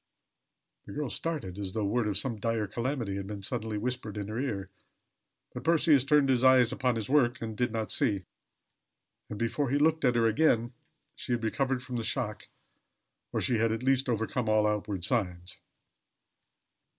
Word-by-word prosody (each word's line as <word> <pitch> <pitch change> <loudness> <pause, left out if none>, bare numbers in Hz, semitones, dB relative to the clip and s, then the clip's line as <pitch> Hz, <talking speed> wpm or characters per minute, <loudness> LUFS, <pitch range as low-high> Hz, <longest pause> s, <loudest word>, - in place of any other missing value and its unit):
The - - -8
girl 145 -3 -3
started 140 - -4
as 95 -2 -4
though 110 -2 -1
word 110 +2 0
of 100 -2 +1
some 115 0 -1
dire 115 0 0
calamity 115 -1 -3
had 100 -1 -5
been 100 -1 -7
suddenly 110 +2 -2
whispered 110 -2 -3
in 100 0 -4
her 110 +2 -3
ear; 100 -8 -3 0.8
but - - -7
Percy 165 0 +4
had 135 -1 +3
turned 150 -1 +4
his 130 -2 +2
eyes 130 -2 +6
upon 125 -2 0
his 110 -3 -3
work, 125 -4 +3
and 110 -1 -5
did 120 +1 0
not 110 -1 -3
see; 105 - +1 1.0
and 105 - -5
before 120 +5 -1
he 140 - +2
looked 160 +1 +2
at 125 -2 +3
her 115 -1 +3
again 120 0 +2 0.4
she - - -4
had 120 -1 -1
recovered 130 +2 -1
from 125 -1 -5
the 115 - -2
shock, - - -2 0.8
or - - -1
she 120 -3 +2
had 115 0 +2
at 115 +2 -3
least 135 0 +2
overcome 110 0 -1
all 110 0 +3
outward 105 -3 -1
signs. 90 -6 -2
115 Hz, 185 wpm, -29 LUFS, 105-130 Hz, 1.0 s, eyes